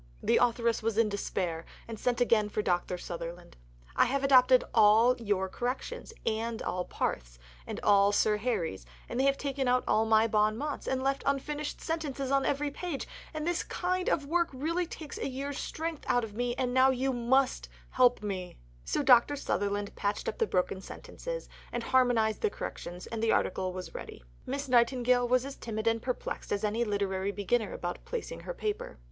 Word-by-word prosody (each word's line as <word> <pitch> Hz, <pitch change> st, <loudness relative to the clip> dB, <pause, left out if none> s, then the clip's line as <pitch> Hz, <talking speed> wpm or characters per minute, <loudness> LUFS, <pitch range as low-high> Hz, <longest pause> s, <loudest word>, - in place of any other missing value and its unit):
The -, -, +3 dB
authoress 235 Hz, -1 st, +2 dB
was 220 Hz, -1 st, -1 dB
in 225 Hz, -2 st, +4 dB
despair, 180 Hz, -5 st, -2 dB, 0.2 s
and 225 Hz, -2 st, -7 dB
sent 245 Hz, -1 st, 0 dB
again 225 Hz, -4 st, +3 dB
for 210 Hz, 0 st, -2 dB
Dr. 180 Hz, -1 st, 0 dB
Sutherland: 170 Hz, 0 st, -7 dB, 0.4 s
"I -, -, +5 dB
have 275 Hz, +2 st, -1 dB
adopted 255 Hz, -2 st, +6 dB
all 225 Hz, +3 st, +6 dB
your 205 Hz, -4 st, 0 dB
corrections, 250 Hz, -, -4 dB
and 225 Hz, +1 st, -1 dB
all 180 Hz, 0 st, -2 dB
Parthe's, -, -, -3 dB, 0.3 s
and -, -, -4 dB
all 200 Hz, -1 st, +5 dB
Sir 210 Hz, +1 st, +3 dB
Harry's; 205 Hz, -, -2 dB, 0.2 s
and 245 Hz, -, -3 dB
they 265 Hz, -, +3 dB
have 275 Hz, 0 st, +3 dB
taken 275 Hz, -2 st, -2 dB
out 250 Hz, 0 st, +3 dB
all 220 Hz, +1 st, +3 dB
my 220 Hz, 0 st, +5 dB
bons 215 Hz, -1 st, +2 dB
mots 295 Hz, +3 st, -4 dB
and 260 Hz, 0 st, 0 dB
left 275 Hz, 0 st, 0 dB
unfinished 290 Hz, +2 st, -2 dB
sentences 285 Hz, -5 st, -3 dB
on 275 Hz, -1 st, +2 dB
every 285 Hz, +1 st, 0 dB
page; 330 Hz, -2 st, -4 dB, 0.2 s
and 310 Hz, -1 st, -4 dB
this 350 Hz, 0 st, 0 dB
kind 365 Hz, 0 st, -1 dB
of 290 Hz, -, +1 dB
work 340 Hz, +3 st, +1 dB
really 330 Hz, +6 st, -1 dB
takes 310 Hz, -3 st, -8 dB
a -, -, -2 dB
year's 275 Hz, +2 st, -4 dB
strength 325 Hz, -1 st, -4 dB
out 245 Hz, -1 st, +2 dB
of 220 Hz, -2 st, -6 dB
me; 240 Hz, +2 st, -1 dB
and 250 Hz, -1 st, -1 dB
now 260 Hz, +1 st, +6 dB
you 265 Hz, +1 st, 0 dB
must 255 Hz, +2 st, +1 dB, 0.2 s
help 245 Hz, -3 st, +4 dB
me." 185 Hz, -3 st, -4 dB, 0.3 s
So, 295 Hz, -, -1 dB
Dr. 255 Hz, +2 st, +6 dB
Sutherland 205 Hz, -6 st, -2 dB
patched 205 Hz, 0 st, -2 dB
up -, -, -3 dB
the 450 Hz, -, +2 dB
broken 185 Hz, -, 0 dB
sentences -, -, -7 dB, 0.2 s
and 240 Hz, -, -3 dB
harmonized 245 Hz, -4 st, +2 dB
the 435 Hz, -, +2 dB
corrections, 180 Hz, -, -7 dB
and 225 Hz, -1 st, -5 dB
the 225 Hz, -, +3 dB
article 185 Hz, -1 st, 0 dB
was 185 Hz, 0 st, -7 dB
ready. -, -, -8 dB, 0.2 s
Miss 275 Hz, +2 st, -3 dB
Nightingale 245 Hz, 0 st, +3 dB
was 255 Hz, +1 st, +2 dB
as 275 Hz, 0 st, -7 dB
timid 220 Hz, -1 st, -4 dB
and 230 Hz, 0 st, +2 dB
perplexed 250 Hz, 0 st, -4 dB
as 205 Hz, +1 st, -1 dB
any 215 Hz, +3 st, +1 dB
literary 200 Hz, -2 st, -1 dB
beginner 210 Hz, +2 st, 0 dB
about 175 Hz, 0 st, -5 dB
placing -, -, -5 dB
her -, -, -6 dB
paper. 425 Hz, -3 st, -4 dB
245 Hz, 190 wpm, -30 LUFS, 210-275 Hz, 0.4 s, adopted